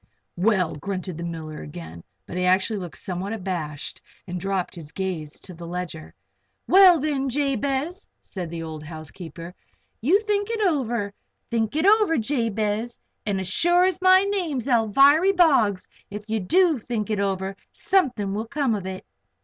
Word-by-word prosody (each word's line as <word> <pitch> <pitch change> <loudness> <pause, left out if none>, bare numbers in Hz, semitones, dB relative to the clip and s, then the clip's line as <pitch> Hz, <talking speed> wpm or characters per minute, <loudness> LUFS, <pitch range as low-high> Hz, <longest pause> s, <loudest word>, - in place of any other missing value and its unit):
"Well!" 185 -2 +2
grunted 185 +2 -4
the - - -4
miller 160 -2 -6
again, 80 +2 -9 0.2
but - - -8
he 180 - 0
actually 190 +3 +2
looked 175 -3 -7
somewhat 190 +2 -4
abashed 175 -8 -4 0.2
and 180 -1 -5
dropped 190 0 -2
his 160 -3 -10
gaze 170 -6 -4
to 185 - -9
the 170 0 -9
ledger. 175 -3 -6 0.5
"Well, 370 -3 +7
then, 275 -2 -1
Jabez 280 - -1
Potter," - - -51
said 180 -4 -6
the 165 0 -5
old 160 -1 -6
housekeeper, 160 +2 -9 0.5
"you 330 - +4
think 415 -1 -1
it 460 -1 -2
over 240 - 0 0.4
think 225 +1 0
it 315 +3 +1
over, 415 -5 +5
Jabez. 225 -2 -1 0.3
And 200 -2 0
as 190 - -3
sure 350 - +4
as 370 -1 0
my 370 +1 +6
name's 350 - -1
Alviry 275 - +5
Boggs, 265 - +3 0.2
if 210 +1 -7
you 220 0 -1
do 330 - +3
think 220 -2 -3
it 210 - 0
over, 195 -1 -1 0.2
something 250 - +1
will 220 +3 -3
come 280 -2 0
of 195 -3 -3
it!" 190 0 -6
210 Hz, 165 wpm, -24 LUFS, 180-290 Hz, 0.5 s, Well